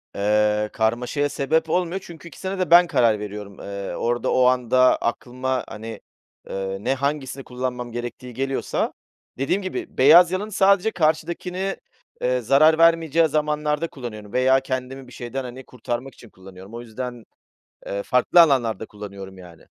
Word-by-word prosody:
Eee, 105 +1 +1
karmaşaya 125 +6 0
sebep 160 +4 0
olmuyor 180 +2 0
çünkü 170 0 -11
2'sine 190 +3 -6
de 185 -2 -1
ben 175 0 +8
karar 115 -7 +2
veriyorum. 105 -1 -8
Eee, 100 -1 -6
orada 120 +1 -1
o 130 - +4
anda 125 0 +4
aklıma, 130 +2 -2
hani, 110 +1 -8 0.5
ııı, 95 0 -4
ne - - +2
hangisini 135 -1 -3
kullanmam 125 -1 -5
gerektiği 120 +1 -6
geliyorsa, 135 +2 -2 0.4
dediğim 135 +9 0
gibi, 185 - -6
beyaz 165 +6 +7
yalanı 205 +3 -3
sadece 200 +2 +3
karşımdakine, 180 +4 -1 0.4
eee, 125 0 +1
zarar 145 +7 +5
vermeyeceği 165 -1 +4
zamanlarda 150 +1 -1
kullanıyorum 110 -7 -9
veya 130 +1 +4
kendimi 130 0 -5
bir 125 - -14
şeyden, 125 +2 -5
hani, 125 +1 -8
kurtarmak 125 +1 -5
için 115 - -16
kullanıyorum. 95 +2 -14
O 120 - -6
yüzden, 120 0 -7 0.6
eee, 100 0 -3
farklı 125 +10 +4
alanlarda 120 -9 +3
kullanıyorum, 100 -2 -10
yani. 85 -3 -14
130 Hz, 145 wpm, -23 LUFS, 115-155 Hz, 0.6 s, ben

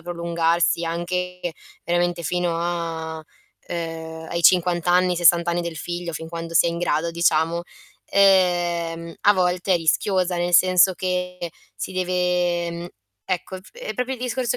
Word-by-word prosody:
prolungarsi 170 0 0
anche 180 +2 -3 0.4
veramente 175 0 0
fino 175 +1 -1
a 165 -2 -3 0.5
uhm, 160 -1 -5
ai 170 - -1
50 175 0 +4
anni, 180 0 +4
ai 175 - 0
60 175 0 +5
anni 175 0 0
del 170 -1 -5
figlio, 175 +1 -5
fin 160 0 -6
quando 165 0 -6
si - - +6
è - - +2
in 170 - -4
grado, 170 -1 0
diciamo, 165 0 +1 0.5
ehm, 175 -4 +2
a 205 - +5
volte 180 0 +1
è - - +4
rischioso. 180 +2 +1
Nel 175 0 0
senso 185 +1 +5
che 180 0 -3 0.3
si - - -5
deve 180 -1 0
mhmm, 170 +1 -6 0.4
ecco, 185 +1 -3
f 190 - -19
è - - -6
proprio 250 +1 -2
il 250 - -13
discorso 250 -1 -1
175 Hz, 155 wpm, -22 LUFS, 170-180 Hz, 0.5 s, si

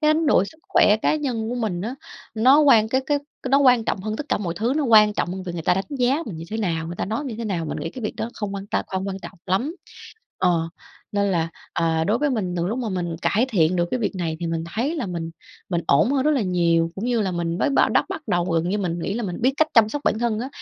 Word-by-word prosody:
Cái 305 0 +4
đánh 320 0 0
đổi 200 - +4
sức 315 - -13
khỏe 210 - +5
cá - - +3
nhân 245 -7 -2
của 245 - -2
mình 215 -8 -2
á 230 +6 -4 0.4
nó 260 +7 +5
quan 230 -7 +5
cái 260 +3 +1
cái 290 -1 +2 0.3
nó 275 +1 +5
quan 250 -5 +5
trọng 195 - -1
hơn 215 +2 -3
tất 295 - -5
cả - - +1
mọi 175 -4 -3
thứ, 235 +5 0
nó 305 - +1
quan 215 -3 +6
trọng 205 - -1
hơn 190 0 -5
việc 180 - -5
người 170 -2 -5
ta 180 - +3
đánh 195 - -1
giá 265 +6 +2
mình 190 -8 -6
như 165 - -7
thế 220 - -2
nào, 165 -6 -1
người 170 +1 -6
ta - - -2
nói 220 +4 -2
mình - - -4
như 225 - -6
thế 230 - -4
nào, 180 -6 -2
mình - - -4
nghĩ 165 - -4
cái 255 - -9
việc - - -3
đó 230 - -3
không 205 -2 -4
quan 195 0 -6
tâm, - - -1
không 190 +1 -3
quan 190 - -4
trọng 190 - -10
lắm. 240 - 0 0.6
Ờ, 170 -3 +1 0.4
nên 200 -1 +1
là, 165 -2 0 0.2
ờ, 160 -1 +1
đối 215 +6 +1
với 295 0 +1
mình 190 -7 -2
từ 170 - 0
lúc 225 +7 -2
mà 245 -3 -2
mình 175 -4 -3
cải 230 +5 +2
thiện 180 -6 +2
được 175 -1 +1
cái 250 - -1
việc 215 - -1
này 165 -3 -2
thì 170 - -2
mình 165 0 -2
thấy 280 +9 -1
là 300 - -2
mình 170 -2 -4 0.4
mình 170 -2 0
ổn 160 - +4
hơn 270 -2 +2
rất 305 - +3
là 270 -7 +2
nhiều, 170 -3 +2
cũng 200 - -5
như 240 -2 +1
là 190 -3 0
mình 170 0 -2
mới 290 - +1
bá - - +4
đắp - - +3
bắt 320 - -5
đầu 175 -3 +1
gần 170 -1 0
như 205 - 0
mình 175 -4 -2
nghĩ 195 +4 -3
là 235 - -2
mình 180 -4 -4
biết 255 +3 +3
cách 315 0 +3
chăm 225 -2 +6
sóc 290 +6 -4
bản 220 - +2
thân 230 -2 0
á, 255 - -4
205 Hz, 305 wpm, -23 LUFS, 175-245 Hz, 0.6 s, quan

